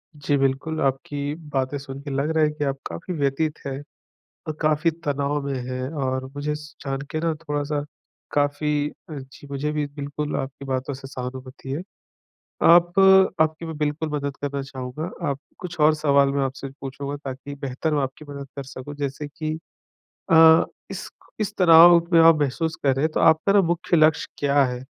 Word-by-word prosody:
जी, 145 0 0
बिल्कुल, 135 +4 0
आपकी 140 +2 -1 0.2
बातें 135 +1 0
सुन 135 0 -8
के 145 - -7
लग 140 +3 0
रहा 155 - +4
है 150 - +4
कि 150 -1 -4
आप 135 0 -1
काफ़ी 85 - -6
व्यथित 150 +1 -1
हैं 135 0 -4 0.7
अ, - - 0
काफ़ी 155 +2 +2
तनाव 145 0 0
में 140 - -2
हैं 130 +1 -3
और 130 0 -1
मुझे 150 +1 -2
स 150 0 -11
जान 135 0 -2
के 155 - -2
ना 165 -1 0
थोड़ा-सा 150 -1 -2 0.5
काफ़ी 145 0 +1 0.2
अ, - - -6
जी, 135 +2 -13
मुझे 145 +2 -2
भी 150 -1 -1
बिल्कुल 145 +1 -4
आपकी 135 +1 -5
बातों 130 +1 -2
से 135 0 -9
सहानुभूति 130 +1 -7
है। 150 +5 -2 0.8
आप 175 +2 +6 0.4
आपकी 160 +1 +1
मैं 160 -2 -6
बिल्कुल 150 +1 -1
मदद 140 -2 -3
करना 140 -1 -2
चाहूँगा, 130 +4 -6 0.2
आप 140 0 -2 0.2
कुछ 180 -2 -7
और 155 +1 +6
सवाल 140 -2 +3
मैं 140 -1 +1
आपसे 135 +1 -5
पूछूँगा, 140 +1 -5
ताकि 140 0 -7
बेहतर 140 +3 -3
मैं 145 - +2
आपकी 135 +3 -6
मदद 140 -1 -7
कर 140 - -5
सकूँ, 135 +2 -8
जैसे 145 +1 -4
कि 155 +2 -4 0.7
अ, 160 0 +8 0.3
इस - - -6 0.3
इस 210 0 -1
तनाव 170 -1 +9 0.2
में 165 - +7
आप 165 -2 +7
महसूस 160 +4 -1
कर 135 -2 +3
रहे 135 - 0
हैं, 160 - 0
तो - - -1
आपका 160 +5 +4
ना 200 - +6
मुख्य 175 0 +1
लक्ष्य 155 0 +4
क्या 140 0 +3
है? 125 0 -4
145 Hz, 185 wpm, -24 LUFS, 135-155 Hz, 0.8 s, तनाव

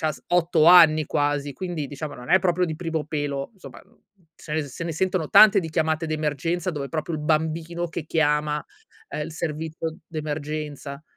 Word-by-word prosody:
c'ha 155 -1 0
s - - -14
8 170 -2 +3
anni 160 -3 +7
quasi, 145 -1 -1
quindi 165 -1 -4
diciamo 145 +1 -6
non 125 0 -10
è 185 - +7
proprio 180 -1 +1
di 160 -2 -4
primo 165 -2 -3
pelo, 145 -2 -3
somma, 190 - -12
n - - -26 0.4
se 150 - -10
ne 155 - +1
se 145 +3 -7
ne 165 - -3
sentono 185 -1 -1
tante 215 -1 +8
di 165 -3 -6
chiamate 160 +1 0
d'emergenza, 155 +3 -1
dove 145 -4 -5
proprio 160 +2 -3
il 155 - -4
bambino 160 +3 -1
che 165 -1 -5
chiama, 150 -1 +1 0.5
uhm, - - -4
il 160 +2 -6
servizio 160 0 -4
d'emergenza. 150 -2 -5
155 Hz, 185 wpm, -24 LUFS, 150-165 Hz, 0.5 s, tante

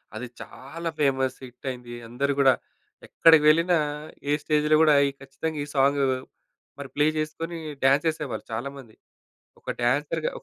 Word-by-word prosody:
అది 125 - -5
చాలా 165 +6 -7
famous 130 -2 +1
hit 125 +2 -11
అయింది. 125 -2 -7
అందరూ 140 +4 -1
గూడా 135 -1 +6 0.5
ఎక్కడికి 160 -2 +5
వెళ్ళినా 170 +3 +4 0.5
ఏ 145 - +3
స్టేజ్‌లో 150 0 +2
గూడా 155 -2 +6 0.3
ఖచ్చితంగా 150 +3 -5
ఈ - - -5
సాంగ్ 140 +1 +3 0.8
మరి 140 -2 -7
ప్లే 145 +1 +3
చేసుకొని 165 +2 -4 0.3
డాన్స్ 140 +4 +4
చేసేవాళ్ళు 145 -9 -3
చాలామంది. 125 0 -6 0.7
ఒక - - -4
డాన్సర్‌గా 145 +6 0
140 Hz, 130 wpm, -25 LUFS, 130-155 Hz, 0.8 s, గూడా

